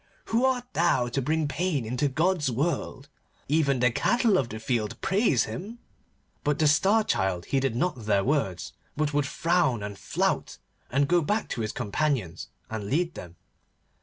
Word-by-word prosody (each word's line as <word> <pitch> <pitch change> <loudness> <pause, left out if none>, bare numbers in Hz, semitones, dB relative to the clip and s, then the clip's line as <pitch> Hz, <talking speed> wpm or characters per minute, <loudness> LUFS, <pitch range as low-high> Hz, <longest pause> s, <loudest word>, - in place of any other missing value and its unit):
Who 235 +3 +4
art 255 -2 +1
thou 160 -8 +2
to 135 +3 -1
bring 155 +3 0
pain 145 -2 -1
into 125 +5 0
God's 160 +2 +1
world? 140 +1 -2 0.4
Even 140 -2 +2
the 125 -1 +4
cattle 230 - +2
of 130 -9 +1
the 110 - -6
field 110 -2 -2
praise 190 - +2
Him.' 190 - -6 0.7
But 145 0 +1
the 155 -2 +3
Star 195 +9 +4
Child 95 - -1
heeded 135 -3 0
not 125 -5 -1
their 100 -2 +3
words, 100 - -1 0.2
but 150 -1 0
would 145 -1 +1
frown 165 - +1
and 100 0 -5
flout, 95 - -1 0.3
and 140 +2 +2
go 175 +2 +3
back 210 +7 -1
to 120 - -3
his 110 - -2
companions, 105 - -2 0.2
and 110 -2 -5
lead 165 - 0
them. 85 -1 -10
140 Hz, 165 wpm, -27 LUFS, 115-170 Hz, 0.7 s, Who